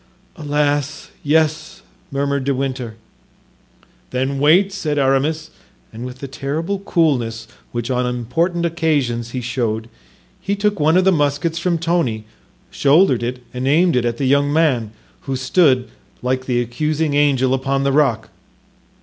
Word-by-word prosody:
"Alas, 145 Hz, -2 st, -1 dB
yes," 160 Hz, +4 st, 0 dB, 0.3 s
murmured 140 Hz, 0 st, -1 dB
De 140 Hz, 0 st, 0 dB
Winter. 130 Hz, -4 st, -3 dB, 1.1 s
"Then 130 Hz, +2 st, -2 dB
wait," 180 Hz, +7 st, +4 dB
said 155 Hz, -7 st, -2 dB
Aramis; 145 Hz, +4 st, +1 dB, 0.4 s
and 120 Hz, +3 st, -6 dB
with 125 Hz, 0 st, -10 dB
the 140 Hz, -, -5 dB
terrible 155 Hz, +9 st, -3 dB
coolness 125 Hz, -, 0 dB, 0.2 s
which 120 Hz, +1 st, -3 dB
on 125 Hz, 0 st, 0 dB
important 165 Hz, +9 st, -1 dB
occasions 145 Hz, -9 st, 0 dB
he 125 Hz, +1 st, -4 dB
showed, 115 Hz, -2 st, -2 dB, 0.5 s
he 200 Hz, +2 st, -1 dB
took 205 Hz, 0 st, 0 dB
one 155 Hz, +3 st, +4 dB
of 185 Hz, -, +4 dB
the 190 Hz, -, +5 dB
muskets 150 Hz, +1 st, 0 dB
from 175 Hz, 0 st, 0 dB
Tony, 165 Hz, -10 st, 0 dB, 0.5 s
shouldered 130 Hz, -5 st, +2 dB
and 125 Hz, +1 st, -3 dB
aimed 165 Hz, +4 st, +3 dB
it 125 Hz, -, +2 dB
at 120 Hz, -1 st, -1 dB
the 140 Hz, -, -1 dB
young 140 Hz, +2 st, +3 dB
man, 145 Hz, -8 st, +2 dB, 0.4 s
who 135 Hz, -, 0 dB
stood, 130 Hz, -1 st, +2 dB, 0.4 s
like 130 Hz, +1 st, -1 dB
the 125 Hz, -2 st, +1 dB
accusing 150 Hz, +5 st, -1 dB
angel, 135 Hz, -3 st, +2 dB
upon 135 Hz, +1 st, 0 dB
the 140 Hz, -, +2 dB
rock. 135 Hz, -6 st, +1 dB
140 Hz, 140 wpm, -19 LUFS, 125-160 Hz, 1.1 s, the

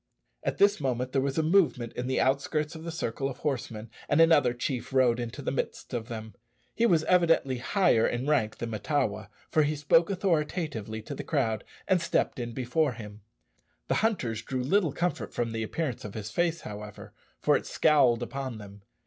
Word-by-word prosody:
At -, -, -2 dB
this 200 Hz, -5 st, +4 dB
moment 130 Hz, -1 st, -1 dB
there 135 Hz, -, +2 dB
was 140 Hz, +1 st, -2 dB
a 160 Hz, -, +3 dB
movement 155 Hz, -9 st, +2 dB
in 125 Hz, 0 st, -4 dB
the 130 Hz, -, 0 dB
outskirts 145 Hz, +3 st, 0 dB
of 160 Hz, -1 st, -9 dB
the 165 Hz, -, -4 dB
circle 135 Hz, -4 st, -2 dB
of 130 Hz, -, -7 dB
horsemen, 115 Hz, -5 st, -4 dB, 0.2 s
and 145 Hz, -, +3 dB
another 160 Hz, -6 st, +6 dB
chief 125 Hz, +1 st, -3 dB
rode 125 Hz, -3 st, +3 dB
into 120 Hz, +4 st, -5 dB
the -, -, -1 dB
midst 135 Hz, -, -4 dB
of 115 Hz, -2 st, -3 dB
them. 110 Hz, -3 st, -7 dB, 0.4 s
He 235 Hz, -, +3 dB
was 165 Hz, -6 st, +3 dB
evidently 165 Hz, -8 st, +3 dB
higher 130 Hz, -, +3 dB
in 120 Hz, +2 st, -2 dB
rank 140 Hz, -8 st, +1 dB
than 120 Hz, -1 st, -4 dB
Mahtawa, 110 Hz, -2 st, -1 dB, 0.2 s
for 155 Hz, -, +4 dB
he 150 Hz, +1 st, +1 dB
spoke 150 Hz, +4 st, +3 dB
authoritatively 155 Hz, -, -1 dB
to 140 Hz, -, -6 dB
the -, -, -6 dB
crowd, 115 Hz, -8 st, 0 dB, 0.2 s
and 185 Hz, -2 st, +3 dB
stepped 165 Hz, -, 0 dB
in 120 Hz, -1 st, -4 dB
before 130 Hz, +4 st, 0 dB
him. 105 Hz, -2 st, -10 dB, 0.7 s
The -, -, +2 dB
hunters 130 Hz, -, 0 dB
drew 125 Hz, +2 st, -3 dB
little 165 Hz, +3 st, +2 dB
comfort 175 Hz, +5 st, -2 dB
from 120 Hz, -1 st, -1 dB
the 110 Hz, 0 st, -3 dB
appearance 130 Hz, +3 st, -3 dB
of 105 Hz, -, -8 dB
his 110 Hz, 0 st, -5 dB
face, 170 Hz, +4 st, 0 dB
however, 105 Hz, 0 st, -9 dB, 0.3 s
for -, -, +3 dB
it -, -, -2 dB
scowled 130 Hz, -6 st, +3 dB
upon 130 Hz, -1 st, -5 dB
them. 100 Hz, -1 st, -11 dB
130 Hz, 190 wpm, -28 LUFS, 115-155 Hz, 0.7 s, another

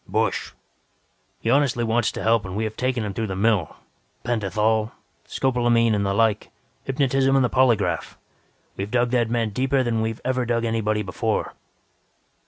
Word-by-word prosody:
"Busch! -, -, -1 dB, 0.9 s
He 115 Hz, -, 0 dB
honestly 135 Hz, -3 st, +2 dB
wants 115 Hz, 0 st, +1 dB
to -, -, -5 dB
help 115 Hz, -1 st, +3 dB
and 95 Hz, 0 st, -6 dB
we 110 Hz, -, -1 dB
have 110 Hz, 0 st, -4 dB
taken 125 Hz, -2 st, -1 dB
him 100 Hz, -, -4 dB
through 110 Hz, +2 st, -2 dB
the 95 Hz, -, -4 dB
mill. 100 Hz, -5 st, +1 dB, 0.5 s
Pentathol, 110 Hz, -1 st, 0 dB, 0.3 s
scopolamine 120 Hz, -3 st, +2 dB
and 100 Hz, -1 st, +1 dB
the 100 Hz, -, 0 dB
like; 110 Hz, -2 st, +1 dB, 0.4 s
hypnotism 135 Hz, 0 st, +1 dB
and 135 Hz, -2 st, +4 dB
the -, -, 0 dB
polygraph. 120 Hz, -6 st, +1 dB, 0.6 s
We've 100 Hz, +1 st, -4 dB
dug 120 Hz, +1 st, +1 dB
that 120 Hz, -3 st, +1 dB
man 115 Hz, -2 st, 0 dB
deeper 130 Hz, +4 st, +1 dB
than 115 Hz, -2 st, 0 dB
we 110 Hz, -, 0 dB
have 115 Hz, -, -8 dB
ever 130 Hz, 0 st, 0 dB
dug 120 Hz, -1 st, 0 dB
anybody 110 Hz, -2 st, 0 dB
before." 90 Hz, -3 st, -2 dB
115 Hz, 170 wpm, -23 LUFS, 110-125 Hz, 0.9 s, and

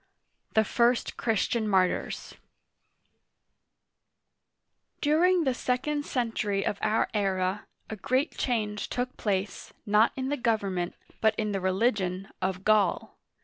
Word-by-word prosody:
THE 220 Hz, -, +5 dB
FIRST 235 Hz, +3 st, +1 dB
CHRISTIAN 225 Hz, 0 st, 0 dB
MARTYRS 190 Hz, -3 st, 0 dB, 2.7 s
DURING 340 Hz, +4 st, +3 dB
the 265 Hz, -3 st, +1 dB
second 270 Hz, +4 st, -1 dB
century 215 Hz, -5 st, -1 dB
of 200 Hz, -, -2 dB
our 220 Hz, +1 st, +2 dB
era, 195 Hz, -1 st, -1 dB, 0.2 s
a 220 Hz, -, -6 dB
great 260 Hz, -, 0 dB
change 210 Hz, -4 st, -1 dB
took 250 Hz, +1 st, -3 dB
place, 200 Hz, -1 st, -3 dB
not 210 Hz, +2 st, +4 dB
in 265 Hz, 0 st, -3 dB
the 290 Hz, -, -1 dB
government, 200 Hz, -7 st, -1 dB, 0.3 s
but 220 Hz, 0 st, +3 dB
in 215 Hz, -1 st, -1 dB
the 195 Hz, -1 st, -2 dB
religion, 190 Hz, -1 st, 0 dB
of 185 Hz, 0 st, -2 dB
Gaul. 210 Hz, -4 st, +2 dB
215 Hz, 115 wpm, -28 LUFS, 195-245 Hz, 2.7 s, THE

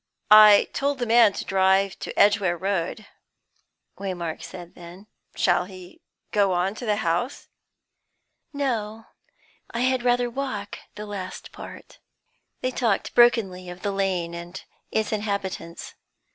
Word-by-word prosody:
"I 215 Hz, -1 st, +9 dB
told 280 Hz, 0 st, -1 dB
the 245 Hz, -, -2 dB
man 230 Hz, -2 st, +6 dB
to -, -, -5 dB
drive 190 Hz, 0 st, +2 dB
to -, -, -5 dB
Edgware 200 Hz, -4 st, +4 dB
Road," 195 Hz, +2 st, -2 dB, 0.9 s
Waymark 175 Hz, -5 st, -4 dB
said 175 Hz, -1 st, -10 dB
then. 175 Hz, +3 st, -12 dB, 0.3 s
"Shall 180 Hz, -1 st, +2 dB
he 185 Hz, -1 st, -13 dB, 0.3 s
go 200 Hz, -3 st, +2 dB
on 180 Hz, +2 st, 0 dB
to 235 Hz, +2 st, -8 dB
the 210 Hz, -, +2 dB
house?" 175 Hz, +12 st, -2 dB, 1.0 s
"No; 225 Hz, -6 st, -3 dB, 0.6 s
I 235 Hz, -, -3 dB
had 260 Hz, 0 st, +2 dB
rather 245 Hz, 0 st, +2 dB
walk 235 Hz, -5 st, -5 dB, 0.2 s
the 210 Hz, -, -7 dB
last 200 Hz, -3 st, -7 dB
part." -, -, -11 dB, 0.6 s
They 255 Hz, -, -1 dB
talked 230 Hz, -5 st, -1 dB
brokenly 195 Hz, -7 st, +3 dB
of 180 Hz, 0 st, -10 dB
the 205 Hz, -, 0 dB
Lane 190 Hz, -4 st, -1 dB
and 175 Hz, +2 st, -7 dB, 0.3 s
its 220 Hz, -1 st, -1 dB
inhabitants. 200 Hz, -5 st, -4 dB
200 Hz, 130 wpm, -24 LUFS, 185-225 Hz, 1.0 s, I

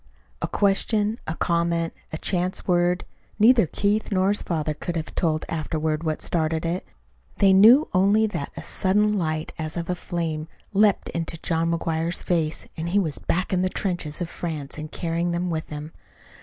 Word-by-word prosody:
A -, -, 0 dB
question, 205 Hz, +2 st, +2 dB
a 160 Hz, -, -2 dB
comment, 170 Hz, -1 st, 0 dB, 0.2 s
a 160 Hz, -, -3 dB
chance 180 Hz, +2 st, -1 dB
word 175 Hz, 0 st, +2 dB, 0.3 s
neither 225 Hz, -2 st, +6 dB
Keith 210 Hz, +6 st, 0 dB
nor 190 Hz, 0 st, +2 dB
his 205 Hz, -, +1 dB
father 155 Hz, -3 st, -1 dB
could 175 Hz, +3 st, -5 dB
have 160 Hz, -1 st, -4 dB
told 155 Hz, -2 st, 0 dB
afterward 155 Hz, -1 st, -2 dB
what 155 Hz, -2 st, -2 dB
started 160 Hz, -1 st, 0 dB
it. 175 Hz, +3 st, -2 dB, 0.5 s
They 195 Hz, -1 st, +5 dB
knew 230 Hz, +10 st, +7 dB
only 200 Hz, +4 st, +4 dB
that 205 Hz, -10 st, -4 dB
a -, -, -6 dB
sudden 210 Hz, +2 st, +2 dB
light 155 Hz, -4 st, -2 dB
as 155 Hz, +1 st, -4 dB
of 170 Hz, +1 st, -2 dB
a -, -, -1 dB
flame 165 Hz, -3 st, -3 dB, 0.3 s
leaped 205 Hz, 0 st, +3 dB
into 165 Hz, 0 st, -3 dB
John 165 Hz, 0 st, 0 dB
McGuire's 165 Hz, 0 st, -1 dB
face 160 Hz, -3 st, -1 dB
and 165 Hz, +1 st, -3 dB
he 190 Hz, -, +1 dB
was 165 Hz, -7 st, 0 dB
back 185 Hz, +2 st, -1 dB
in 180 Hz, -, +2 dB
the 185 Hz, -, +1 dB
trenches 175 Hz, -5 st, -3 dB
of 175 Hz, -, -1 dB
France 155 Hz, -5 st, -5 dB
and 155 Hz, 0 st, -7 dB
carrying 170 Hz, 0 st, -1 dB
them 175 Hz, +1 st, -1 dB
with 160 Hz, -1 st, -3 dB
him. 150 Hz, +1 st, -6 dB
170 Hz, 180 wpm, -24 LUFS, 160-190 Hz, 0.5 s, knew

